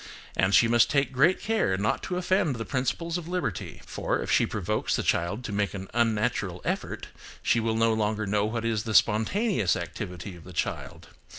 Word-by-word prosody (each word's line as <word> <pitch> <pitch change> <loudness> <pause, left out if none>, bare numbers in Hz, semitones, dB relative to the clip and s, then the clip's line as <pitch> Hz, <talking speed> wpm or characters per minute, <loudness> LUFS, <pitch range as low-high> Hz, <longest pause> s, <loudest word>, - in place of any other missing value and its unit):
And 95 +1 +3
she 115 - +6
must 120 0 +4
take 140 -1 +1
great 140 +8 +3
care 215 - +1
not 100 +2 0
to 180 - -1
offend 180 -5 +1
the 115 -1 -4
principles 165 +6 -1
of 165 - -9
liberty. 175 - -3
For, - - -2
if - - -3
she - - +4
provokes - - -1
the - - -1
child 100 +8 0
to 105 - -5
make 100 0 -1
an 95 -1 -7
unnatural 115 -3 0
effort, - - -3 0.3
she 115 - +3
will 110 0 0
no 115 0 +3
longer 110 0 0
know 100 +1 +1
what 115 +1 -2
is 115 -2 0
the 110 -1 -3
spontaneous 110 - +3
activity 90 0 -6
of 85 - -13
the 90 - -11
child. - - -4
110 Hz, 195 wpm, -27 LUFS, 105-140 Hz, 0.3 s, she